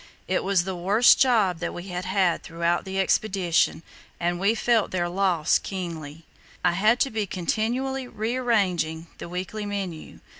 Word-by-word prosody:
It 185 - 0
was 195 -2 +2
the 190 0 -4
worst 200 +7 +5
job 215 -10 +3
that - - -4
we 175 +2 -7
had 180 0 -4
had 185 -2 +1
throughout 170 +2 -1
the 190 0 -3
Expedition, 190 -4 +1 0.4
and 175 0 -1
we 200 +4 +2
felt 230 -1 +2
their 175 -2 -1
loss 175 -3 +2
keenly. 165 -5 -6 0.4
I - - +5
had 215 +7 +3
to 270 - +2
be 215 -2 -2
continually 245 +9 -2
rearranging 205 -10 0
the - - -7
weekly 185 +4 -4
menu. 195 -6 -5
190 Hz, 155 wpm, -25 LUFS, 175-215 Hz, 0.4 s, worst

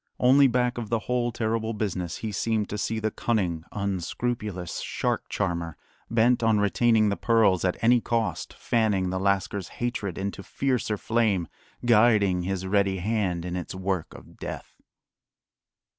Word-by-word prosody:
Only, 135 +3 +6
back 125 -1 0
of 110 -3 -5
the 115 - +2
whole 120 -1 0
terrible 115 0 -1
business, 95 -5 -3
he 110 - -2
seemed 110 +1 -1
to 105 - -3
see 110 - -1
the 110 0 -1
cunning, 90 -8 -1
unscrupulous 100 0 -3
shark - - -2
charmer, 85 -5 -2 0.3
bent 120 +2 +3
on 110 -2 +3
retaining 110 +1 +3
the 100 - 0
pearls 110 -6 +3
at 90 -1 0
any 120 +1 +5
cost, 110 -9 -1
fanning 105 -6 +1
the 95 - -1
lascar's 100 -1 0
hatred 115 -7 -3
into 100 0 -4
fiercer 125 -2 -1
flame, 105 -6 +1 0.4
guiding 105 -5 +4
his 95 +1 -3
ready 100 0 +1
hand 95 -3 -1
in 90 0 -3
its 90 +1 -5
work 95 -2 -3
of - - -14
death. - - -7
105 Hz, 150 wpm, -26 LUFS, 95-115 Hz, 0.4 s, Only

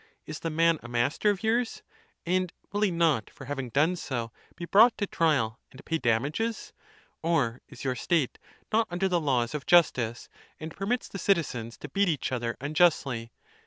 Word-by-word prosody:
Is 155 0 -6
the 165 - -3
man 165 0 +3
a - - -9
master 120 - +1
of 205 0 -1
yours? 230 +2 0 0.4
and 185 0 0 0.2
will 205 - -2
he 210 - +4
not, 165 - +1
for 135 - -12
having 135 -2 -4
done 155 +9 +2
so, 120 -9 -4 0.2
be 175 - -6
brought 225 +7 +6
to 205 - 0
trial, 135 - +1
and 135 - -14
pay 165 0 -1
damages? 145 - -1 0.5
Or 140 -8 0
is - - -11
your 130 -2 0
state 150 +1 0 0.3
not 225 +1 +3
under 180 +2 0
the 175 -2 +1
laws 125 -5 0
of 150 -1 -5
justice, 125 -9 +3 0.3
and 160 +1 -7
permits 225 +6 -1
the 195 - -7
citizens 135 - 0
to - - -8
beat 195 +6 +2
each 150 -5 -1
other 120 -2 -2
unjustly 140 -6 +1
155 Hz, 180 wpm, -28 LUFS, 125-180 Hz, 0.5 s, brought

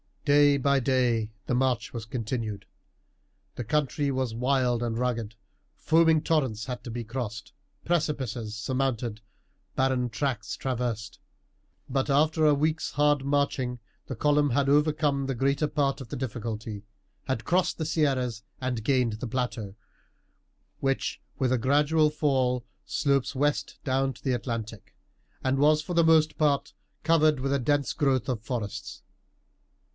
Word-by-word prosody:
Day 145 -1 +5
by 140 0 +2
day 120 -4 +1
the - - -1
march 125 -2 0
was 115 -2 -5
continued. 110 -3 -4 0.9
The - - -4
country 145 +3 0
was 130 -3 -1
wild 125 0 +1
and 115 -1 -1
rugged, 115 -3 -2 0.4
foaming 160 -1 +4
torrents 130 -10 0
had 125 -2 -5
to 120 - -6
be 120 +1 -4
crossed, 110 -2 -5 0.3
precipices 130 -10 -1
surmounted, 120 -2 -2 0.5
barren 130 -2 +1
tracts 130 -3 -2
traversed. 120 -4 -3 0.7
But 135 +2 0
after 155 +3 +3
a 150 - +6
week's 155 +2 0
hard 145 -1 +2
marching 140 -3 0 0.3
the 130 - -4
column 145 +3 +2
had 140 +2 +2
overcome 150 -1 +2
the 135 -1 -2
greater 140 +4 +1
part 140 -2 0
of 125 - -9
the - - -4
difficulty, 110 -4 -5 0.4
had 115 -4 -2
crossed 180 +1 +1
the 160 - -2
Sierras 135 -7 0 0.2
and 125 -4 -2
gained 125 -2 +2
the 110 +4 -5
plateau, 115 -5 -3 1.0
which 135 0 -1 0.2
with 130 -2 +1
a 130 - +2
gradual 150 +5 +3
fall 130 -5 0 0.2
slopes 140 -1 0
west 145 +2 0
down 135 0 +1
to - - -18
the 130 - +1
Atlantic, 115 -3 -5 0.5
and 130 +1 +1
was 150 +1 +4
for 175 - -5
the 170 -1 +4
most 155 -1 +4
part 140 -2 +1 0.3
covered 155 -3 +4
with 135 +1 -1
a 140 - +2
dense 140 +2 +1
growth 135 -6 +1
of 120 -4 -1
forests. 110 -4 -5
130 Hz, 145 wpm, -27 LUFS, 120-145 Hz, 1.0 s, a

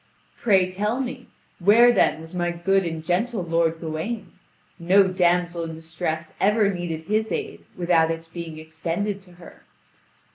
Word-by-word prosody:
"Pray 190 -5 +2
tell 210 +6 -1
me. 255 -1 -5 0.3
Where 220 +6 +6
then 160 - +2
was 160 +2 -12
my 175 -1 0
good 190 +3 +1
and 160 -1 -5
gentle 195 +4 0
lord 165 -1 +1
Gawain? 165 +8 -4 0.5
No 190 +3 +5
damsel 175 -2 +1
in 165 -1 -6
distress 160 0 -4
ever 205 0 +3
needed 170 -3 -4
his 215 +5 -1
aid 430 -2 -4
without 170 -2 +3
its 165 0 -4
being 165 -1 -7
extended 165 +6 -3
to 180 -2 -18
her." 175 -1 -15
175 Hz, 150 wpm, -24 LUFS, 165-205 Hz, 0.5 s, Where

